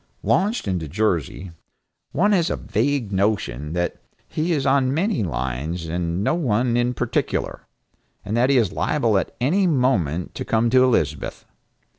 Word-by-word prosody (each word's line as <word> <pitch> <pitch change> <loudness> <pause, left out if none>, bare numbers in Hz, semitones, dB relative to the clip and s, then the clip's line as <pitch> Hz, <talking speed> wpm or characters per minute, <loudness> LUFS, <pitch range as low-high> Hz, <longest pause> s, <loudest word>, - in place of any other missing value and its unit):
Launched 210 - +1
into 90 -5 -2
Jersey, 90 - -1 0.6
one 205 +7 +2
has 175 -5 +2
a - - 0
vague 140 -8 -1
notion 95 - -1
that 85 0 -1 0.3
he 160 +3 -2
is 145 -5 0
on 135 -1 +3
many 185 - 0
lines 80 - -3
and 85 +2 -2
no - - +2
one 120 -7 +1
in 120 +1 +1
particular, 120 -1 -2 0.6
and 105 - -2
that 125 +3 +3
he 140 - +4
is 110 -6 +2
liable 115 0 +1
at - - -5
any 180 +10 +2
moment 105 - +1
to - - -5
come 115 +1 +1
to 130 0 +6
Elizabeth. 75 - 0
115 Hz, 155 wpm, -22 LUFS, 90-140 Hz, 0.6 s, to